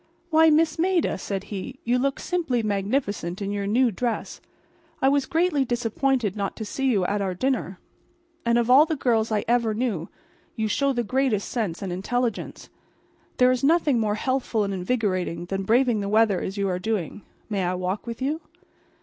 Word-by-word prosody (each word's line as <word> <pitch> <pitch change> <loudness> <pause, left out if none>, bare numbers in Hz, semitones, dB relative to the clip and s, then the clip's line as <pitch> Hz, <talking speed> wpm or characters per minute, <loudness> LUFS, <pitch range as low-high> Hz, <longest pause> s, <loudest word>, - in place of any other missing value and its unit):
"Why, 320 0 +6
Miss 315 +1 +3
Maida," 360 -1 +2
said 195 -1 -4
he, 200 +7 -6
"you 245 +2 +1
look 275 +1 0
simply 320 -10 -1
magnificent 200 -3 -1
in 200 -1 -3
your 200 -1 -2
new 240 +3 +3
dress. 235 +3 -3 0.6
I 265 - +3
was 280 -1 +1
greatly 330 -4 +2
disappointed 240 -2 0
not 200 -2 -3
to 220 - -5
see 270 +6 -2
you 205 -8 +2
at 205 +2 0
our 190 -2 -2
dinner. 245 -5 -1 0.7
And 235 0 +2
of 235 -1 +1
all 275 +5 +7
the 315 - -1
girls 230 -5 +1
I 210 -1 0
ever 235 -2 +2
knew, 215 -9 -2 0.5
you 220 -1 -1
show 275 +6 +1
the 240 -2 -1
greatest 245 -2 0
sense 205 -7 -2
and 185 -2 -3
intelligence. 235 +5 -2 0.7
There 250 0 +5
is 255 +1 -1
nothing 295 -4 +3
more 210 -2 0
healthful 255 -2 0
and 200 -1 -2
invigorating 185 -4 -1
than 195 +1 -3
braving 240 0 +3
the 200 -1 -3
weather 215 -3 +3
as 195 - -4
you 200 0 0
are 180 -1 -1
doing. 205 -1 -3 0.3
May 200 -3 -1
I 180 +1 0
walk 185 +5 -3
with 235 +2 -5
you?" 305 +4 -1
225 Hz, 185 wpm, -25 LUFS, 200-265 Hz, 0.7 s, all